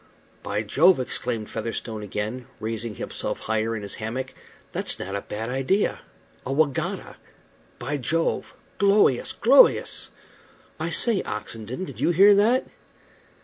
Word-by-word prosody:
"By 105 - -2
Jove!" 160 - +4
exclaimed 120 -3 -3
Featherstone 110 -1 -4
again, 105 +4 -4
raising 110 0 -4
himself - - -4
higher 110 +1 -1
in 105 - -5
his 100 - -3
hammock, 130 +4 -4 0.4
"that's - - -2
not 95 +1 -5
a 100 - -2
bad 110 +4 -5
idea. 135 +11 +1 0.4
A 130 - -4
wegatta! 145 -1 -1 0.6
By 145 +5 -3
Jove! 165 +5 -1 0.2
glowious! 200 - +3
glowious! - - +4 0.7
I - - -2
say, 225 -5 +4
Oxenden, 115 - -5
did - - -10
you - - +2
hear 195 +4 +7
that?" 225 +6 +3
125 Hz, 130 wpm, -25 LUFS, 110-170 Hz, 0.7 s, hear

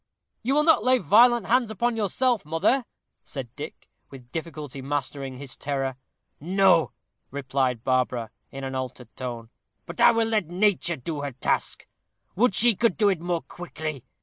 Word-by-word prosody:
"You 265 +5 0
will 300 - +4
not 320 -9 +5
lay 255 +1 +5
violent 235 - +5
hands 240 +2 +2
upon 235 +3 0
yourself, 225 +2 +1
mother?" 180 - +1 0.4
said 130 -4 -8
Dick, 150 +2 -8 0.2
with 125 -3 -13
difficulty 155 -5 -6
mastering 140 -1 -3
his 135 -1 -8
terror. 135 -2 -2 0.4
"No," 185 0 +3 0.4
replied 130 -3 -1
Barbara, 125 -3 0 0.2
in 135 0 -8
an 135 0 -4
altered 130 -2 -6
tone. 120 -3 -6 0.3
"But 170 - -6
I - - +9
will 230 -1 +2
let 215 -6 0
nature 180 -1 +1
do 145 +3 -5
her 140 -2 -4
task. 125 - -1 0.5
Would 220 -1 +3
she 235 +3 +5
could 230 -1 +1
do 210 -2 +4
it 185 -5 -1
more 175 -1 -2
quickly. 155 -6 -6
160 Hz, 160 wpm, -25 LUFS, 135-215 Hz, 0.5 s, I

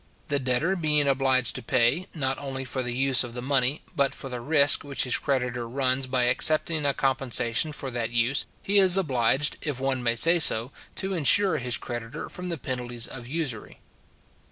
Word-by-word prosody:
The 145 -1 0
debtor 130 +8 0
being 150 -3 +2
obliged 130 -2 +1
to - - -6
pay, 120 +10 0
not 135 -3 -2
only 135 -2 -6
for 130 0 -4
the 120 -1 -4
use 130 -1 +3
of 120 -1 -9
the 125 - -5
money, 135 +1 +1
but 140 -2 0
for 135 - -8
the 125 -1 -6
risk 145 +1 +4
which 140 -1 -2
his 125 - -1
creditor 125 -4 -3
runs 130 +1 0
by 130 -1 0
accepting 155 +4 +1
a 140 - +1
compensation 130 0 0
for 135 -3 -6
that 120 -1 -3
use, 120 +4 0 0.2
he 200 +1 +3
is 190 -1 +6
obliged, 135 -4 +1
if 145 -4 -4
one 135 -1 -1
may 115 -1 0
say 165 +8 +4
so, 120 -4 +5 0.2
to 195 0 -4
insure 185 +3 +4
his 125 -2 -1
creditor 120 -1 -7
from 180 0 -7
the 170 - -3
penalties 120 -3 -4
of 120 -2 -9
usury. 135 -6 -5
130 Hz, 190 wpm, -25 LUFS, 125-145 Hz, 0.2 s, is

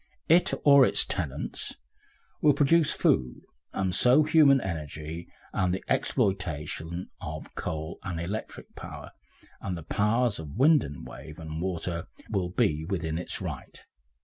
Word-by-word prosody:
It 170 +3 +5
or 140 -2 +8
its - - +4
tenants - - -3 0.7
will 150 - +6
produce 150 +2 +4
food, 65 -2 +1 0.3
and 95 -1 -1
so 125 +10 +5
human 150 -3 +5
energy, 80 - -6 0.2
and 90 -1 +1
the 95 - -2
exploitation 85 -2 -1
of 75 -2 -7
coal 80 +1 -4
and 90 -4 -4
electric 95 +6 -6
power, - - -9 0.5
and 90 -3 -3
the 85 - -8
powers 105 +5 +1
of 75 -1 -8
wind 150 +3 +5
and 70 -1 -8
wave 75 +1 -10
and 80 0 -5
water 90 -1 -2 0.2
will 95 -4 0
be 80 -3 +1
within 80 -3 -2
its 90 - -3
right. - - -6
90 Hz, 140 wpm, -28 LUFS, 80-125 Hz, 0.7 s, or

